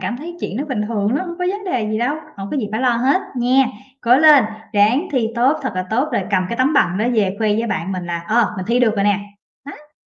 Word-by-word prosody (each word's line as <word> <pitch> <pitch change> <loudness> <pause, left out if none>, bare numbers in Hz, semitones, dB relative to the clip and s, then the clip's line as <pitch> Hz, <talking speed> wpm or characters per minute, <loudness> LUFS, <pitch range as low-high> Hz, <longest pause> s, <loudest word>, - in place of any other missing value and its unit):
cảm 185 +5 -3
thấy 340 +6 -8
chuyện 200 - -4
đó 280 - -2
bình 245 -6 -1
thường 215 +1 0
lắm, 365 +5 -3
hông 345 0 -7
có 360 - -1
vấn 410 0 -6
đề 245 - -1
gì 215 - -1
đâu, 250 +6 0 0.2
hổng 195 0 -6
có - - -2
gì 225 -7 -2
phải 220 - -1
lo 255 -1 +3
hết 265 +9 +2 0.2
nhé. 255 +2 +2 0.3
Cố 245 +1 +4
lên, 295 -3 +7 0.3
ráng 215 +7 +2
thi 245 -5 +1
tốt 255 +6 +2
thật 265 -4 -3
là 185 - -1
tốt 255 +7 +1
rồi - - 0
cầm 185 -2 +1
cái 235 - -4
tấm 260 +4 +2
bằng 185 -9 +2
đó 215 - 0
về 200 -4 +1
khoe 220 -1 +1
với 220 +3 0
bạn 190 -3 -3
mình 180 -2 -5
là, 170 -1 -4
ờ, 230 0 +2
mình 185 - -4
thi 240 +2 +2
được 225 -3 +3
rồi 200 - +1
nè. 205 0 +2 0.5
Nó. 300 +1 -15
235 Hz, 280 wpm, -19 LUFS, 205-270 Hz, 0.5 s, lên